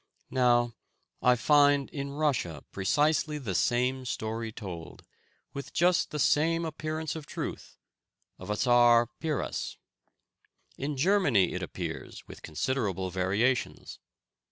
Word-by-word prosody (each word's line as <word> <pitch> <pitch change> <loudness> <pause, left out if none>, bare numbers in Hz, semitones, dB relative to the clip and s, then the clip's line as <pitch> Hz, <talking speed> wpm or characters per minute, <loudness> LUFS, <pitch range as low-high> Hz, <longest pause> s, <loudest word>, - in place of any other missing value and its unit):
Now, 120 -2 +3 0.5
I 125 0 +5
find 145 +2 +4
in 140 -1 -4
Russia 135 - -1
precisely 150 +9 +1
the 120 -10 -4
same 125 +6 +1
story 110 -1 -3
told, 90 -7 -8 0.5
with 140 - -7
just 175 +1 +3
the 150 - -4
same 165 +4 +2
appearance 155 +1 -4
of 155 -2 -7
truth, - - -6 0.6
of - - -9
a 105 - 0
Czar 120 0 +4
Piras. 155 -3 -3 1.0
In 140 +1 -4
Germany 145 - +3
it - - -3
appears - - -6
with - - -11
considerable 95 - -2
variations. 100 +8 -1
130 Hz, 115 wpm, -29 LUFS, 110-150 Hz, 1.0 s, I